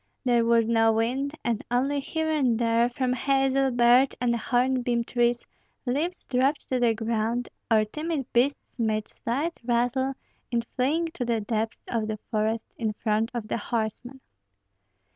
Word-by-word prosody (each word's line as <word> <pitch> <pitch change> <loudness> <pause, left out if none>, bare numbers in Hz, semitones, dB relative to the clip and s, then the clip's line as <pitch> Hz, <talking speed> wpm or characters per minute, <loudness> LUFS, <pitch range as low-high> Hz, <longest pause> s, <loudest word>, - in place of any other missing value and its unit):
There 240 -2 +3
was 230 -1 +3
no 225 -1 +4
wind, 260 +7 -1
and 235 -3 0
only 270 +4 +1
here 320 +3 -2
and 275 -7 +2
there, 230 0 +2
from 250 0 -1
hazel, 270 0 +2
birch, 245 +2 +4
and 240 -2 +1
hornbeam 245 0 +1
trees 240 0 0 0.4
leaves 305 +9 -2
dropped 270 +3 +1
to 255 - +1
the 235 -2 +3
ground, 225 +2 -1 0.2
or 220 -2 +4
timid 305 +4 -3
beasts 260 +4 +2
made 215 -2 0
slight 290 +8 -3
rustle 245 +3 +1 0.3
in 235 -1 +1
fleeing 310 +6 +1
to 270 - -3
the 235 -2 0
depths 220 +1 -3
of 225 -2 -1
the 215 0 -3
forest 220 0 0
in 220 -2 -1
front 220 +1 0
of 225 -3 -3
the - - -1
horsemen. 235 +4 -3
240 Hz, 155 wpm, -26 LUFS, 230-265 Hz, 0.4 s, no